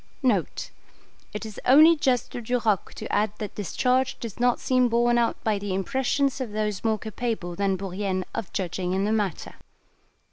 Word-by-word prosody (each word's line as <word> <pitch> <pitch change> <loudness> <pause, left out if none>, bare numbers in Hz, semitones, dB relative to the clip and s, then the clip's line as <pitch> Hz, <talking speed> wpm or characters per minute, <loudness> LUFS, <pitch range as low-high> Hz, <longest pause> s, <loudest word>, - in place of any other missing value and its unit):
[It 210 +1 -5
is 215 -2 -8
only 310 +6 +7
just 260 -5 0
to 240 - -5
Duroc 225 -4 0
to - - -6
add 210 0 +1
that 210 - -5
this 200 -6 -6
charge 255 +1 +1
does 230 -1 -7
not 245 0 +2
seem 255 -1 +2
borne 240 +1 +3
out 235 - +1
by 215 -2 +1
the 200 -2 -3
impressions 265 +6 0
of 230 -5 -4
those 210 -2 -2
more 220 -1 +2
capable 220 -5 -4
than 195 0 0
Bourrienne 190 0 -3
of 215 - -4
judging 180 0 -2
in 190 +1 +1
the 210 - 0
matter. 205 -6 -2
220 Hz, 175 wpm, -25 LUFS, 195-245 Hz, -, only